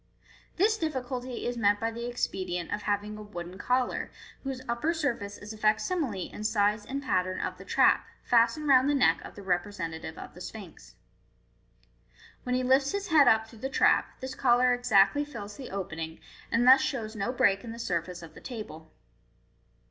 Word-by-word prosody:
This 430 Hz, +5 st, +3 dB
difficulty 255 Hz, -, -3 dB
is 240 Hz, 0 st, -2 dB
met 205 Hz, -1 st, +3 dB
by 225 Hz, +1 st, -1 dB
the 235 Hz, +1 st, -5 dB
expedient 185 Hz, -7 st, -3 dB
of 210 Hz, -, -2 dB
having 210 Hz, +1 st, -2 dB
a -, -, -7 dB
wooden 185 Hz, -3 st, -8 dB
collar, 250 Hz, +3 st, 0 dB, 0.3 s
whose 265 Hz, -2 st, -5 dB
upper 235 Hz, +9 st, 0 dB
sur 285 Hz, -6 st, 0 dB
face 200 Hz, -2 st, -8 dB
is 210 Hz, +2 st, -8 dB
a 215 Hz, -, -12 dB
facsimile 215 Hz, -, 0 dB
in 210 Hz, -, -7 dB
size 210 Hz, -1 st, +1 dB
and 275 Hz, +1 st, -4 dB
pattern 185 Hz, -6 st, 0 dB
of -, -, -4 dB
the -, -, -10 dB
trap, -, -, +3 dB, 0.2 s
fastened 240 Hz, +6 st, +3 dB
round 265 Hz, 0 st, +5 dB
the 290 Hz, -, +2 dB
neck 270 Hz, -, +3 dB
of -, -, -10 dB
the 200 Hz, -, -10 dB
representative 175 Hz, -4 st, -3 dB
of -, -, -9 dB
the 180 Hz, -, -12 dB
Sphinx. 200 Hz, -3 st, -10 dB, 1.5 s
When 250 Hz, -1 st, -1 dB
he 255 Hz, -, 0 dB
lifts 265 Hz, +4 st, +3 dB
his 400 Hz, -1 st, -3 dB
head 305 Hz, -3 st, +6 dB
up 220 Hz, 0 st, +4 dB
through 225 Hz, -1 st, -15 dB
the 265 Hz, -, -3 dB
trap, -, -, +2 dB
this 260 Hz, 0 st, -5 dB
collar 250 Hz, -1 st, +4 dB
exactly 245 Hz, +2 st, +4 dB
fills 210 Hz, -8 st, -8 dB
the 265 Hz, -, -8 dB
opening, 165 Hz, -4 st, -5 dB, 0.3 s
and 235 Hz, +1 st, +2 dB
thus 260 Hz, +1 st, +8 dB
shows 230 Hz, -5 st, -3 dB
no 205 Hz, +3 st, -1 dB
break 200 Hz, -6 st, +2 dB
in 230 Hz, -, -7 dB
the 230 Hz, -, -8 dB
surface 175 Hz, -4 st, -3 dB
of 160 Hz, -1 st, -11 dB
the -, -, -13 dB
table. 160 Hz, -, -8 dB
230 Hz, 185 wpm, -29 LUFS, 200-260 Hz, 1.5 s, thus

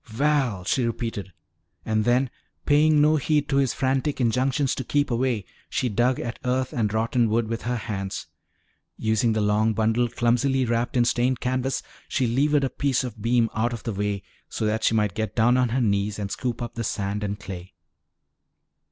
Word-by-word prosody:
"Val," 125 Hz, -4 st, 0 dB
she 130 Hz, +6 st, +1 dB
repeated, 115 Hz, -4 st, -3 dB, 0.5 s
and 110 Hz, -1 st, +1 dB
then, 125 Hz, +1 st, +2 dB, 0.3 s
paying 150 Hz, 0 st, +4 dB
no 155 Hz, +1 st, +4 dB
heed 150 Hz, +1 st, +1 dB
to 140 Hz, -, +1 dB
his 135 Hz, -3 st, +3 dB
frantic 135 Hz, +2 st, 0 dB
injunctions 130 Hz, +3 st, +1 dB
to 130 Hz, -, -3 dB
keep 145 Hz, +2 st, 0 dB
away, 120 Hz, -4 st, 0 dB, 0.2 s
she 125 Hz, -, 0 dB
dug 120 Hz, +4 st, +1 dB
at 120 Hz, 0 st, -5 dB
earth 130 Hz, 0 st, 0 dB
and 110 Hz, -4 st, 0 dB
rotten 115 Hz, +1 st, +1 dB
wood 115 Hz, +1 st, +1 dB
with 115 Hz, +1 st, -3 dB
her 120 Hz, +2 st, -2 dB
hands. 100 Hz, -4 st, -4 dB, 0.7 s
Using 110 Hz, +1 st, +1 dB
the 110 Hz, -, 0 dB
long 105 Hz, +2 st, +2 dB
bundle 115 Hz, +2 st, +2 dB
clumsily 125 Hz, +3 st, +1 dB
wrapped 120 Hz, +2 st, 0 dB
in 120 Hz, -, +4 dB
stained 120 Hz, +1 st, +1 dB
canvas, 130 Hz, +1 st, -1 dB, 0.2 s
she 130 Hz, -, 0 dB
levered 140 Hz, +5 st, +2 dB
a 135 Hz, -, +1 dB
piece 140 Hz, -3 st, 0 dB
of 115 Hz, -4 st, -7 dB
beam 115 Hz, +1 st, +3 dB
out 120 Hz, +3 st, 0 dB
of 115 Hz, -, -6 dB
the 115 Hz, -, -3 dB
way 100 Hz, 0 st, -2 dB, 0.3 s
so 110 Hz, -, -2 dB
that 110 Hz, +1 st, 0 dB
she 115 Hz, -, +3 dB
might 105 Hz, -4 st, +1 dB
get 110 Hz, +1 st, -3 dB
down 120 Hz, +2 st, +4 dB
on 125 Hz, -1 st, +2 dB
her 125 Hz, +3 st, 0 dB
knees 100 Hz, -1 st, 0 dB
and 100 Hz, -1 st, -4 dB
scoop 120 Hz, -2 st, -3 dB
up 120 Hz, -, -6 dB
the 115 Hz, -, -4 dB
sand 100 Hz, 0 st, -2 dB
and 100 Hz, 0 st, -3 dB
clay. 95 Hz, -1 st, -8 dB
120 Hz, 190 wpm, -25 LUFS, 110-130 Hz, 0.7 s, paying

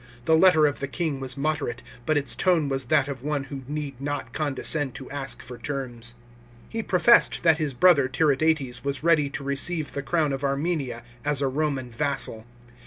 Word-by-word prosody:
The 160 Hz, -, +5 dB
letter 160 Hz, -2 st, +6 dB
of 145 Hz, -1 st, 0 dB
the 140 Hz, -, -3 dB
king 155 Hz, -1 st, -2 dB
was 130 Hz, 0 st, -2 dB
moderate, 140 Hz, -4 st, -2 dB, 0.2 s
but 155 Hz, -, +3 dB
its 135 Hz, -4 st, +1 dB
tone 160 Hz, +2 st, +2 dB
was 135 Hz, -1 st, -1 dB
that 145 Hz, +1 st, +2 dB
of 135 Hz, -3 st, -5 dB
one 145 Hz, 0 st, -2 dB
who 135 Hz, 0 st, -7 dB
need 145 Hz, -3 st, -5 dB
not 140 Hz, -4 st, -4 dB
condescend 145 Hz, -1 st, -1 dB
to 130 Hz, -, -9 dB
ask 140 Hz, -1 st, -5 dB
for 125 Hz, 0 st, -9 dB
terms. 120 Hz, -4 st, -5 dB, 0.5 s
He 225 Hz, -, -3 dB
pro 190 Hz, -, 0 dB
fessed 235 Hz, +6 st, +5 dB
that 165 Hz, -2 st, +4 dB
his 145 Hz, -4 st, -2 dB
brother 145 Hz, -2 st, +5 dB
Tiridates 145 Hz, -2 st, +1 dB
was 140 Hz, +1 st, -3 dB
ready 155 Hz, -4 st, +3 dB
to 140 Hz, -, -5 dB
receive 145 Hz, +3 st, -1 dB
the 140 Hz, -, -4 dB
crown 150 Hz, 0 st, 0 dB
of 135 Hz, +1 st, -4 dB
Armenia 140 Hz, -4 st, -1 dB, 0.2 s
as 145 Hz, -1 st, 0 dB
a 140 Hz, -, +1 dB
Roman 135 Hz, -2 st, -2 dB
vassal. 115 Hz, -3 st, 0 dB
140 Hz, 190 wpm, -25 LUFS, 135-155 Hz, 0.5 s, letter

